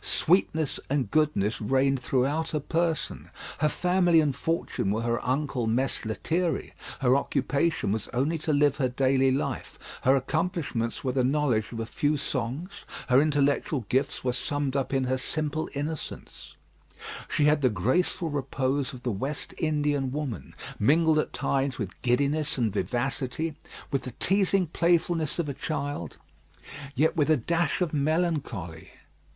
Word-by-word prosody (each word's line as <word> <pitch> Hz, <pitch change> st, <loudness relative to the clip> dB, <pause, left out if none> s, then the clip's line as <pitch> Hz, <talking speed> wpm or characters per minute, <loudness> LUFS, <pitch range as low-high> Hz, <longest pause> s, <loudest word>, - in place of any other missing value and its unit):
Sweetness 160 Hz, -4 st, +2 dB
and 135 Hz, -6 st, 0 dB
goodness 145 Hz, -11 st, +1 dB
reigned 135 Hz, +4 st, +2 dB
throughout 135 Hz, +5 st, 0 dB
her 150 Hz, -, -1 dB
person; 165 Hz, +1 st, -2 dB, 0.3 s
her 150 Hz, +1 st, +3 dB
family 180 Hz, 0 st, +3 dB
and 145 Hz, -4 st, +1 dB
fortune 165 Hz, -11 st, -1 dB
were 110 Hz, +3 st, 0 dB
her 115 Hz, 0 st, -1 dB
uncle 130 Hz, -2 st, -1 dB
Mess 125 Hz, +2 st, 0 dB
Lethierry; 165 Hz, +10 st, -1 dB, 0.3 s
her 130 Hz, -1 st, +4 dB
occupation 140 Hz, -1 st, 0 dB
was 110 Hz, 0 st, -2 dB
only 145 Hz, +7 st, 0 dB
to 155 Hz, -, -1 dB
live 145 Hz, -1 st, +3 dB
her 130 Hz, -4 st, +1 dB
daily 135 Hz, +1 st, +3 dB
life; 135 Hz, -, -3 dB, 0.2 s
her 130 Hz, +2 st, +4 dB
accomplishments 145 Hz, -5 st, -1 dB
were 130 Hz, -, 0 dB
the 130 Hz, 0 st, +1 dB
knowledge 130 Hz, -5 st, +1 dB
of 115 Hz, -, -5 dB
a 115 Hz, -, -2 dB
few 145 Hz, +6 st, 0 dB
songs; 145 Hz, +8 st, -4 dB, 0.3 s
her 130 Hz, +2 st, +6 dB
intellectual 145 Hz, -3 st, +1 dB
gifts 135 Hz, +3 st, 0 dB
were 125 Hz, -1 st, 0 dB
summed 145 Hz, +1 st, -2 dB
up 135 Hz, -2 st, 0 dB
in 135 Hz, -1 st, +1 dB
her 130 Hz, 0 st, 0 dB
simple 155 Hz, +3 st, -2 dB
innocence; 150 Hz, +2 st, -6 dB, 0.7 s
she -, -, +1 dB
had 150 Hz, 0 st, +4 dB
the 130 Hz, -, +4 dB
graceful 150 Hz, -, 0 dB
repose 135 Hz, -1 st, -1 dB
of 125 Hz, -1 st, -10 dB
the 125 Hz, -, 0 dB
West 135 Hz, +9 st, -4 dB
Indian 145 Hz, -4 st, 0 dB
woman, 130 Hz, -, -5 dB, 0.2 s
mingled 155 Hz, +6 st, +4 dB
at -, -, -1 dB
times 135 Hz, -1 st, -1 dB
with 100 Hz, -6 st, -6 dB
giddiness 140 Hz, +5 st, +1 dB
and 115 Hz, -5 st, 0 dB
vivacity, 135 Hz, +7 st, -1 dB, 0.4 s
with 135 Hz, -3 st, +1 dB
the 125 Hz, -, -7 dB
teasing 195 Hz, -1 st, +3 dB
playfulness 170 Hz, -1 st, +1 dB
of 170 Hz, -3 st, -1 dB
a 140 Hz, -, -2 dB
child, 145 Hz, -, -4 dB, 0.8 s
yet 155 Hz, +5 st, +2 dB
with 155 Hz, -2 st, +2 dB
a 155 Hz, -, +5 dB
dash 165 Hz, +6 st, 0 dB
of 175 Hz, -3 st, 0 dB
melancholy. 145 Hz, -, -1 dB
140 Hz, 150 wpm, -27 LUFS, 125-155 Hz, 0.8 s, her